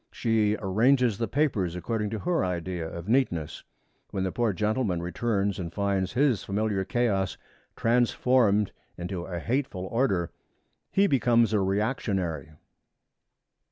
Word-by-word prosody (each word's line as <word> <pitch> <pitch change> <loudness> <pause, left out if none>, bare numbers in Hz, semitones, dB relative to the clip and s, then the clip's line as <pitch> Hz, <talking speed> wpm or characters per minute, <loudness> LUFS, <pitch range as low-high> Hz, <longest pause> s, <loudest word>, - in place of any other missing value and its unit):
She 110 -2 +1
arranges 115 +3 +2
the 115 - 0
papers 105 - 0
according 105 +3 -2
to 110 - -3
her 170 - 0
idea 90 -2 -3
of 85 +2 -8
neatness. 105 - 0 0.5
When 95 -2 -2
the 95 - -1
poor 120 +1 +1
gentleman 105 -1 0
returns 100 +3 -1
and 85 -2 -4
finds 100 0 -1
his 130 -6 +2
familiar 100 -1 -1
chaos 100 -3 0 0.4
transformed 115 -3 +2 0.3
into 90 0 -4
a 90 -2 -4
hateful 115 - -2
order, 95 -6 0 0.6
he 195 - +3
becomes 120 - +3
a 105 - +3
reactionary. 95 - -1
105 Hz, 125 wpm, -27 LUFS, 95-120 Hz, 0.6 s, he